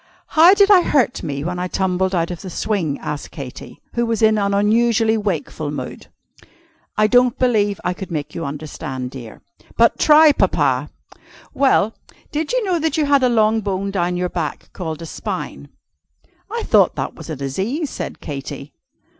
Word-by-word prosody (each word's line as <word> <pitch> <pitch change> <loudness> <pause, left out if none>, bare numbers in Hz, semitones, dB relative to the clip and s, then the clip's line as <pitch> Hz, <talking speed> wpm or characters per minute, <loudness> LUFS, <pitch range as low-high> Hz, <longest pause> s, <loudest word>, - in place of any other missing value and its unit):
"How 340 +5 +7
did 405 0 +5
I 380 -3 +8
hurt 270 -7 +1
me 140 -3 -4
when 180 +2 -3
I 180 - -2
tumbled 190 0 0
out 170 0 0
of 175 - -6
the 190 - -7
swing?" 175 -6 -1
asked 150 -1 -5
Katy, 135 -4 -9
who 235 - 0
was 230 -2 -1
in 220 -1 +4
an 200 0 0
unusually 220 +2 +3
wakeful 175 -7 -3
mood. 140 -3 -6 0.9
"I 215 - +4
don't 245 +2 +3
believe 210 -6 +1
I 180 - 0
could 190 +1 -8
make 155 -4 -4
you 165 - -5
understand, 140 -3 -5
dear." 120 -5 -10 0.3
"But 230 0 +4
try, 305 0 +7
Papa!" - - +1 0.6
"Well 240 -6 +3 0.4
did 305 +1 -2
you - - +1
know 360 -3 +1
that 320 +1 -1
you 305 - +2
had 280 -1 +3
a 255 - +3
long 220 -1 +3
bone 195 -1 -2
down 180 -2 -1
your 180 0 -1
back, 165 -4 -5
called 160 -3 -5
a - - -6
spine?" - - -6 0.8
"I 460 +1 -3
thought - - +3
that - - -3
was - - -11
a 155 - -3
disease," 195 - -3
said - - -6
Katy. 140 0 -7
200 Hz, 180 wpm, -20 LUFS, 165-245 Hz, 0.9 s, I